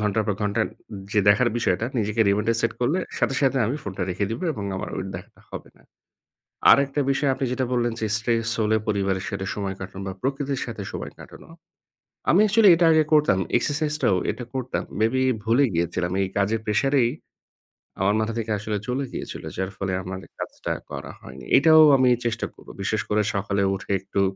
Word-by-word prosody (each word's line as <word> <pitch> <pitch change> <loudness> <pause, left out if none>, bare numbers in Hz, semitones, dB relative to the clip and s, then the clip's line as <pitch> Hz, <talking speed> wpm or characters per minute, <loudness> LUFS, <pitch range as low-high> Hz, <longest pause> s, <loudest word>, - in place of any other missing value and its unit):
ঘণ্টার 105 0 0
পর 105 - 0
ঘণ্টা 105 -1 0 0.5
যে 105 - +4
দেখার 120 +4 +5
বিষয়টা 110 -1 0
নিজেকে 105 +1 -1
reminder 105 +3 +2
set 115 - +1
করলে 145 +9 +1 0.2
সাথে, 135 - +1
সাথে, 135 -1 +2
আমি 125 +6 -1
ফোনটা 95 -2 -5
রেখে 100 +3 -1
দিব 115 - -4
এবং 105 -8 -6
আমার - - -4
ওই 95 - -3
দেখাটা - - -10
হবে - - -8
না। - - -23 0.9
আরেকটা 140 +1 +3
বিষয় 140 +1 +1
আপনি 130 +1 -2
যেটা 130 0 0
বললেন 120 -1 +1
যে - - +1
stress 115 +1 0
হলে 110 +1 +2
পরিবারের 95 -2 0
সাথে 100 -2 -4
সময় 100 -2 -3
কাটানো 95 0 -7
বা 95 - -4
প্রকৃতির 135 0 -2
সাথে 115 -4 -6
সময় - - -6
কাটানো। - - -13 0.8
আমি 180 - +5
actually 210 -1 +6
এটা 170 0 +3
আগে 155 -1 +4
করতাম, 150 -10 +4 0.2
exercise 150 +4 -1
টাও 95 - +3
এটা 125 - -5
করতাম। 130 -1 -2 0.2
Maybe 125 +4 +2 0.2
ভুলে 115 +5 +3
গিয়েছিলাম 85 +1 -1
এই 95 - -1
কাজের 105 +3 +1
pressure 130 +7 +1
এই 115 - +1 0.9
আমার 100 +2 +2
মাথা 110 +1 -1
থেকে 110 -1 -3
আসলে 105 0 -3
চলে 130 +3 -1
গিয়েছিল। - - -6
যার 95 +1 -2
ফলে 95 -1 -2
আমার 95 +1 -6 0.2
কাজটা - - -5 0.2
করা - - -6
হয়নি, 65 -1 -11
এটাও 160 +2 +7 0.2
আমি 130 -1 +4 0.2
চেষ্টা 115 -1 -1
করব। - - -19
বিশেষ 105 +2 0
করে 105 +1 +2
সকালে 100 0 0
উঠে 100 +1 -7
একটু 100 +1 -2
110 Hz, 185 wpm, -24 LUFS, 100-130 Hz, 0.9 s, এটাও